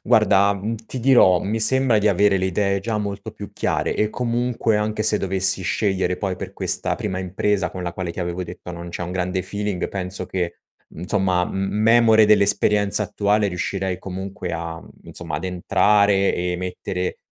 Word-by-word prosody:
Guarda, 100 -3 +4
mhmm, 105 +4 -4
ti 130 - -5
dirò, 120 -8 +5
mi 110 +3 -2
sembra 125 0 +3
di 105 - +2
avere 100 0 +3
le 95 - 0
idee 100 +1 0
già 110 +2 -2
molto 100 0 -5
più 105 -2 -10
chiare - - -1
e 105 - +1
comunque, 120 -1 -1
anche 105 0 -1
se 105 - +3
dovessi 95 0 +1
scegliere 95 -3 0
poi 95 -2 -3
per - - -7
questa - - 0
prima 95 -3 -4
impresa, 95 0 -1
con 90 - -7
la 85 -1 -4
quale 90 -1 -5
ti - - -6
avevo 90 +1 -3
detto, 90 +1 -9
non 85 0 -8
c'è 85 +1 -6
un 90 - -5
grande 90 0 -2
feeling, 100 0 -3
penso 95 -1 -4
che, 90 -2 -4 0.3
insomma, 90 +1 0
m - - -7
m 95 +2 -2
memore 115 -1 +5
dell'esperienza 105 0 +4
attuale, 105 0 0
riuscirei 95 +1 -3
comunque 95 +2 -6
a 85 0 -5 0.2
insomma, - - -7
ad - - -6
entrare 100 +2 +2
e 90 0 -2
mettere 90 0 -4
100 Hz, 180 wpm, -21 LUFS, 90-105 Hz, 0.3 s, dirò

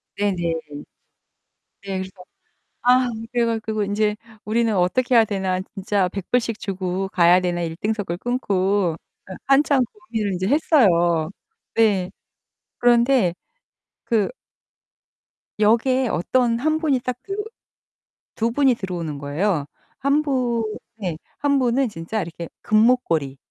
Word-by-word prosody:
네네. 205 -2 0 1.5
네 195 -1 -3
그래서 190 - -5 0.7
아 250 0 +4 0.2
그래 240 -1 +2
가지고 220 -2 -1
'인제 210 +1 0 0.3
우리는 225 0 +1
어떻게 245 +8 +2
해야 225 -1 +7
되나? 190 -3 -1 0.2
진짜 195 -1 0
$100 200 +6 0
씩 230 -2 -4
주고 190 0 -3
가야 175 0 +5
되나.' 175 -1 -1
일등석을 175 +2 -3
끊고 200 -6 0 0.4
예 185 - -6
한참 275 -1 +4
고민을 210 -1 -4
이제 185 +1 -2
했어요. 175 - +3 0.5
네. 200 -5 +3 0.7
그런데 240 -5 +3 0.7
그 225 -4 +1 1.3
역에 240 +5 +3
어떤 235 +5 +1
1 310 +4 +1
분이 300 -5 +1
딱 250 0 -4
들어 400 +1 -4 0.9
2 230 +1 0
분이 265 +1 +3
들어오는 170 -7 -4
거예요. 145 +3 -1 0.3
1 280 +3 +2
분 250 -5 0 0.3
네. 185 -7 -3 0.2
1 280 +1 +2
분은 255 0 +2
진짜 200 +3 -4
이렇게 170 0 -7
금목걸이 215 - +2
215 Hz, 220 characters per minute, -22 LUFS, 185-245 Hz, 1.5 s, 해야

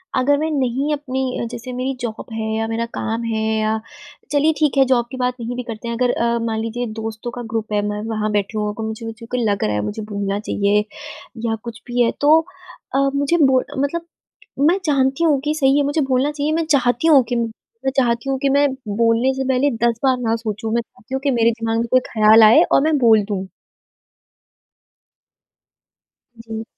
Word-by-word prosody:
अगर 285 +3 +3
मैं 315 +2 -1
नहीं 275 +1 0
अपनी 265 -4 -3
जैसे 245 +1 -7
मेरी 255 +2 -2
जॉब 230 -2 -5
है 220 0 -3
या 225 0 -1
मेरा 230 +1 -2
काम 225 +1 -2
है 225 -1 -2 0.2
या 215 0 0 0.5
चलिए 295 +2 +3
ठीक 300 -3 +1
है 270 - +7
जॉब 245 -2 +2
की 260 - -6
बात 250 0 0
नहीं 240 +1 -4
भी 250 - -4
करते 225 +1 -6
हैं। 235 - -2
अगर 245 0 +2
अ, 235 0 0
मान 225 -1 -2
लीजिए 230 +2 -3
दोस्तों 225 +2 -5
का - - -4
ग्रुप 220 -1 -2
है, 205 - +2
मैं 210 0 -3
वहाँ 215 -1 -1
बैठी 205 +1 -1
हूँ 210 0 -1
तो 225 - -4
मुझे 225 +1 -6 0.3
लग 200 -1 0
रहा 105 - 0
है, 105 - 0
मुझे 220 +1 -4
बोलना 200 0 -2
चाहिए 205 0 +1 0.6
या 225 -1 0
कुछ 235 -1 -8
भी 245 0 0
है। 230 - +3
तो 305 +2 +6 0.6
अ, - - +3 0.2
मुझे 285 +4 +1
बो 260 -1 +4 0.2
मतलब 335 +4 -2 0.6
मैं 355 - +4
जानती 270 +1 +1
हूँ 300 -4 +3
कि 300 - +1
सही 275 -2 +3
है 290 - +3
मुझे 290 +2 0
बोलना 265 +4 +2
चाहिए, 295 +1 -2
मैं 325 0 0
चाहती 265 -1 +2
हूँ 280 -5 +6
कि 245 - 0
मैं 235 +2 -4
चाहती 240 +1 +1
हूँ 270 - 0
कि 275 0 +1
मैं 285 +1 +4 0.3
बोलने 230 +3 +3
से 265 0 -2
पहले 265 +2 +2 0.2
10 230 -1 -1
बार 260 -2 +3
ना 225 -2 0
सोचूँ। 220 -1 -4
मैं 235 - +2
चाहती 230 +1 -15
हूँ 265 - -2
कि 280 - +2
मेरे 230 0 +4
दिमाग 225 0 -1
में 235 - -1
कोई 255 - +6
ख़्याल 220 0 +6
आए 215 +1 +7
और - - +5
मैं 310 -1 +2
बोल 225 -4 +5
दूँ। 195 -2 -4 2.9
जी। 225 -1 -6
240 Hz, 205 wpm, -20 LUFS, 225-270 Hz, 2.9 s, है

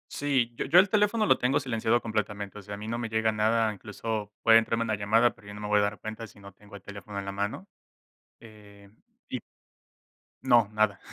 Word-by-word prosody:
Sí, 130 -5 0
yo - - -3
yo 175 - +6
el 195 +2 +4
teléfono 210 +2 +2
lo - - +4
tengo 135 +3 +1
silenciado 120 -2 0
completamente, 105 -2 -4
o - - -10
sea, 100 +1 -7
a - - -10
mí 105 +1 -8
no 115 +1 -2
me 120 -1 -4
llega 110 0 +1
nada, 110 +1 +2
incluso 105 +1 -5
puede 115 -1 +7
entrarme 115 0 +1
una 110 -2 -1
llamada, 110 +4 +3
pero 105 - -18
yo 100 - -8
no 105 - -9
me 105 - -4
voy 105 0 +3
a - - +3
dar 100 0 -2
cuenta 110 +1 -7
si 100 - -18
no 100 0 -12
tengo 100 +1 -15
el 100 - -10
teléfono, 100 0 -9
en 100 - -6
la 100 - -4
mano, 100 - -4 0.7
eh, 105 -3 -16 0.4
y - - -3 1.1
No, 120 -5 +4
nada. 105 -2 +1
110 Hz, 225 wpm, -28 LUFS, 100-115 Hz, 1.1 s, puede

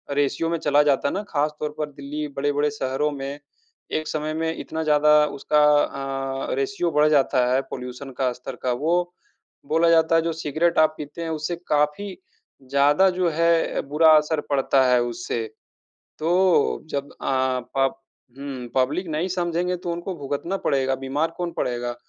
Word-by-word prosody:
Ratio 145 +3 0
में 170 - 0
चला 145 0 +3
जाता 140 -1 +2
है - - -4
ना, 200 - -1
ख़ासतौर 150 0 -1
पर 150 -1 -2
दिल्ली 145 +2 -5
बड़े-बड़े 145 +1 +1
शहरों 145 +1 -1
में 140 +1 -6 0.6
एक 155 - -4
समय 155 0 -2
में 160 0 -1
इतना 160 0 -4
ज़्यादा 150 0 +5
उसका 150 +2 +2 0.9
अ, - - 0
रेश्यो 170 +6 -1
बढ़ 150 0 +4
जाता 135 -3 +3
है। 135 - +3
पॉल्यूशन 125 +2 -7
का 130 -2 +2
स्तर 125 +1 -8
का। 125 - +1
वो 155 +7 0 0.7
बोला 165 +3 +3
जाता 165 0 +4
है 165 - +5
जो 165 0 -2
सिगरेट 160 +2 0
आप 155 0 +4
पीते 150 +3 -8
हैं 165 - -4
उससे 160 +2 -3
काफ़ी 150 +7 0 0.5
ज़्यादा 145 +7 +4
जो 180 -2 +3
है 165 +1 +1
बुरा 160 +2 +5
असर 150 0 0
पड़ता 135 -1 +3
है 125 -1 +4
उससे। 120 -1 -3 0.8
तो 175 0 +2
जब 140 0 -3
अ, 130 -1 0 0.2
पब 135 0 +2 0.4
हुँ। 135 -3 -6
पब्लिक 140 +8 +1
नहीं 160 +3 -1
समझेंगे 175 0 -1
तो 175 0 -4
उनको 175 +2 -4
भुगतना 145 +7 -3
पड़ेगा, 135 -1 +1
बीमार 135 +5 -2
कौन 175 -1 -3
पड़ेगा? 120 0 -2
150 Hz, 165 wpm, -23 LUFS, 135-165 Hz, 0.9 s, ज़्यादा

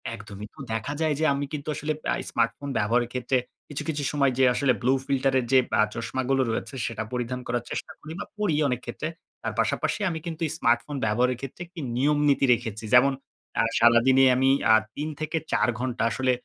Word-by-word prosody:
একদমই। 105 0 -9
তো - - -17
দেখা 115 +6 -2
যায় 155 -2 +2
যে 160 - +2
আমি 140 +1 -2
কিন্তু 145 0 -5
আসলে 150 +1 -2 0.2
আ - - +1 0.2
স্মার্টফোন 120 +4 -1
ব্যবহারের 120 +3 +1
ক্ষেত্রে 125 +1 0 0.3
কিছু, 145 - -5
কিছু 145 -2 -2
সময় 140 -3 +2
যে 135 - +4
আসলে 130 -1 +2
ব্লু 130 +2 +3
ফিল্টার 135 -1 +1
এর 120 - -3
যে 130 - +8 0.2
আ - - +7
চশমাগুলো 130 +3 -1
রয়েছে 135 - -4
সেটা 115 -1 -3
পরিধান 125 +1 -2
করার 120 0 -1
চেষ্টা - - -4
করি 155 - -10
বা - - -4
পড়ি 200 -8 +1
অনেক 125 -1 -1
ক্ষেত্রে। 125 +6 -4 0.3
তার - - -3
পাশাপাশি - - 0
আমি 160 -1 -3
কিন্তু 165 -1 -6
এই - - -5
স্মার্টফোন 120 +2 +1
ব্যবহারের 125 +3 +1
ক্ষেত্রে 135 +6 -8
একটি 175 -1 -11 0.2
নিয়মনীতি 145 0 +3
রেখেছি। 110 -2 -4
যেমন 135 +2 +6 0.5
আ - - +3 0.2
সারাদিনে 120 +3 +5
আমি 130 +1 +3 0.2
আ - - +8 0.2
৩ 150 +2 -3
থেকে 155 +1 -2
৪ - - +3
ঘন্টা 125 -2 -2
আসলে 130 +3 +1
130 Hz, 195 wpm, -26 LUFS, 120-145 Hz, 0.5 s, যে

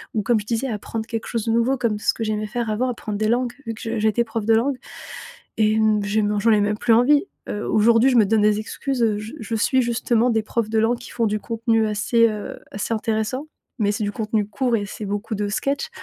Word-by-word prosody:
ou 215 - +2
comme 235 +2 +2
je 205 - -8
disais, 235 +3 -1
apprendre 220 0 -4
quelque 225 -1 -4
chose 230 -3 -2
de 225 - 0
nouveau 235 +4 +2
comme 225 -4 -1
ce - - +2
que 225 - -4
j'aimais 215 0 -2
faire 235 +1 -3
avant, 235 +4 0
apprendre 215 -3 -4
des 215 0 +1
langues, 245 +1 +1
vu 225 - -2
que - - -12
je 230 -1 -3
j'étais 220 +2 +2
prof 225 -1 -4
de 225 - +4
langue. 260 +4 +1 0.8
Et 215 0 +3
hem, 215 -1 +2
j'ai 210 +2 +1
men 205 0 0
j'en 225 +2 +4
ai 210 - +4
même 210 +1 0
plus 230 0 +3
envie! 285 - +4 0.2
Heu, 205 - -3
aujourd'hui, 230 +3 +4
je 250 - +2
me 220 - +6
donne 215 +1 +2
des 210 0 +3
excuses, 255 +3 -3
heu, 215 -2 +2
je 215 +1 -7
je 225 +1 -4
suis 260 +4 +2
justement 235 0 +1
des 220 -1 +1
profs 215 0 -2
de 220 - +1
langue 225 +2 +2
qui - - -11
font 230 -2 0
du 215 0 0
contenu 230 -1 0
assez, 230 +2 +3
heu, 210 -1 -6
assez 205 +3 -2
intéressant, 220 +5 -2 0.3
mais 205 -2 +1
c'est 210 - -3
du 205 - -1
contenu 215 -1 -1
court 245 +2 -1
et 205 - -2
c'est 210 - -7
beaucoup 205 +2 -3
de 205 +1 -1
sketch. 275 +7 -1
225 Hz, 255 wpm, -22 LUFS, 210-235 Hz, 0.8 s, me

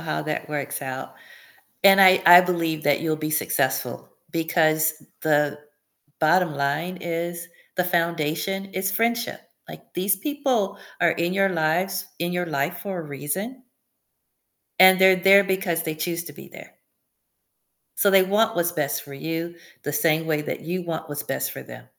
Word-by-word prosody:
how 155 - -3
that 150 0 -4
works 145 -2 -4
out. 130 -1 -6 0.7
And 195 0 +7
I 185 -1 +7
I 175 +1 +11
believe 165 -3 -2
that 145 -2 +2
you'll 160 -1 -1
be 155 0 -4
successful 155 - -1 0.2
because 155 -1 +1 0.3
the 150 -1 +1 0.6
bottom 170 -1 +2
line 145 +6 -2
is 170 0 -4 0.3
the 180 - +1
foundation 170 +2 -1
is 190 0 -1
friendship. 230 +4 -1 0.3
Like, - - -13
these 190 +2 0
people 255 -8 -1 0.2
are 170 -2 +4
in 170 +2 -1
your 195 0 +2
lives 180 +3 -1
in 175 +1 -2
your 180 0 -1
life 150 +2 -2
for 195 -3 -5
a - - -6
reason 160 - -5 1.2
and 185 0 +8
they're 190 0 +6
there 195 +2 +6
because 190 -3 -1
they 160 - -3
choose 170 +2 -3
to - - -9
be - - -13
there. - - -14 1.2
So 200 - +3
they 195 -1 +6
want 215 +3 +1
what's 175 0 +1
best 150 -4 -2
for 140 -1 -11
you 165 +4 -4 0.3
the 145 - -4
same 160 +2 +1
way 150 -2 0
that - - -5
you 180 +3 -4
want 160 -2 -5
what's 145 0 -4
best - - -3
for - - -8
them. - - -12
170 Hz, 165 wpm, -23 LUFS, 155-190 Hz, 1.2 s, I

